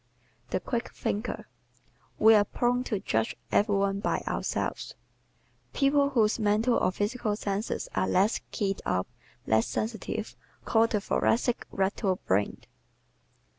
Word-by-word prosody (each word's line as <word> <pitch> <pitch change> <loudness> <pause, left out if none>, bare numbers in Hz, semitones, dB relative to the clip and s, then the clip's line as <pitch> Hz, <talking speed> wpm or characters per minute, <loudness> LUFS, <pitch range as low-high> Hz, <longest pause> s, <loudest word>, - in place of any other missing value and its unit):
The - - 0
Quick 235 +6 -3
Thinker 215 +4 -3 0.3
¶ - - -31 0.4
We 220 +1 +7
are 210 -1 +6
prone 245 +4 0
to 210 -6 -1
judge 110 - -1 0.2
every 205 0 +3
one 195 0 +1
by 210 - -1
ourselves. - - -2 0.8
People 280 0 +3
whose 225 -5 +2
mental 215 +3 +2
or 185 - +2
physical 210 +2 -1
senses 205 0 -3
are - - +1
less 200 +5 +2
"keyed 195 -2 -2
up," 90 0 0 0.4
less 110 +1 +2
sensitive, 220 0 -3 0.3
call 225 0 +4
the 215 - 0
Thoracic 235 +3 +1
"rattle 190 0 0
brained." 100 +2 0
210 Hz, 130 wpm, -28 LUFS, 195-235 Hz, 0.8 s, We